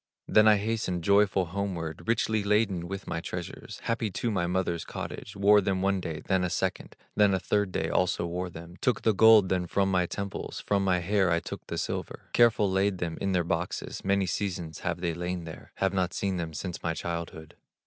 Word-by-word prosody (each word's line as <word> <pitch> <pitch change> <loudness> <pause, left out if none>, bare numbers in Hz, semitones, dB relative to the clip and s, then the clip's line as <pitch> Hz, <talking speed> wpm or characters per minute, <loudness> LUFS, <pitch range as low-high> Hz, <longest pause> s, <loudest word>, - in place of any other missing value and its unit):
Then 110 0 +5
I 105 -1 +7
hastened 100 -5 -2
joyful 100 -1 +4
homeward, 85 -5 -4
Richly 110 -2 +1
laden 100 -4 +1
with 100 +1 -6
my 85 -1 -3
treasures, 90 0 -7
Happy 115 -1 -1
to 115 +5 -2
my 85 -4 0
mother's 85 -2 -1
cottage; - - -7
Wore 100 +1 +5
them 95 -1 0
one 100 0 +2
day, 80 -3 -5
than 95 -1 +1
a 90 - 0
second, - - -2 0.2
Then 105 -2 +4
a - - 0
third 100 +2 0
day 80 - -1
also 90 0 +1
wore 90 +2 -3
them, 85 +1 -11
Took 125 - +1
the 110 - +4
gold 110 -2 +7
then 90 -1 0
from 95 +2 +1
my 90 -2 +2
temples, 100 +1 -5
From 100 -1 0
my 90 -2 +2
hair 95 +1 +2
I 85 0 +2
took - - -8
the - - -4
silver, - - -4
Careful 115 -3 +5
laid 95 +1 +1
them 85 -2 -4
in 95 -1 0
their 90 -1 +2
boxes, 85 +1 -3
Many 100 0 +2
seasons 90 -3 -3
have 85 0 -3
they 85 -2 0
lain 90 +1 -3
there, 80 -1 -10
Have 95 0 0
not 95 -2 0
seen 95 -2 -1
them 80 -2 -4
since 90 +3 -5
my 80 -1 -1
childhood. 85 -2 -5
95 Hz, 210 wpm, -28 LUFS, 85-100 Hz, 0.2 s, I